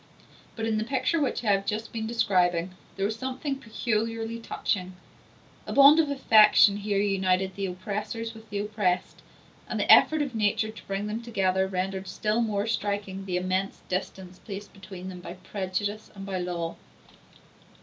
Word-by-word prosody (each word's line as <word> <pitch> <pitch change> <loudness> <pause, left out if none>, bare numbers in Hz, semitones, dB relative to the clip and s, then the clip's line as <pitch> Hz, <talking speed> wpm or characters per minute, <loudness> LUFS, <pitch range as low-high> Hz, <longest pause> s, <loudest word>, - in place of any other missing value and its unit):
But 225 - -3
in 220 -1 0
the - - 0
picture 265 +6 0
which 275 - -1
I 210 - +3
have 195 0 +2
just 215 +3 -3
been 220 -1 -3
describing 180 -6 +1 0.2
there 195 - -1
was 215 +2 -2
something 265 +2 -3
peculiarly 230 -1 -2
touching; 185 -5 -2 0.7
a - - -3
bond 280 +3 +8
of 310 -3 +3
affection 215 -6 +6
here 205 0 -1
united 190 -2 +1
the 200 -1 -2
oppressors 210 +5 -4
with 220 -1 -14
the 205 - -3
oppressed, 205 -3 -1 0.5
and - - -2
the - - +3
effort 310 -1 +5
of 275 -3 -5
nature 215 0 +1
to 220 - -14
bring 195 +1 -2
them 215 +2 -3
together 190 -5 +1
rendered 190 0 -3
still 215 +4 0
more 210 -3 0
striking 200 -3 -2
the 180 -2 -1
immense 185 +2 -2
distance 185 0 -4
placed 200 0 -8
between 190 -2 -9
them 185 -1 -7
by 175 - -7
prejudice 200 +3 -4
and 195 -1 -8
by 190 -2 -3
law. 175 -2 -3
205 Hz, 170 wpm, -27 LUFS, 190-225 Hz, 0.7 s, bond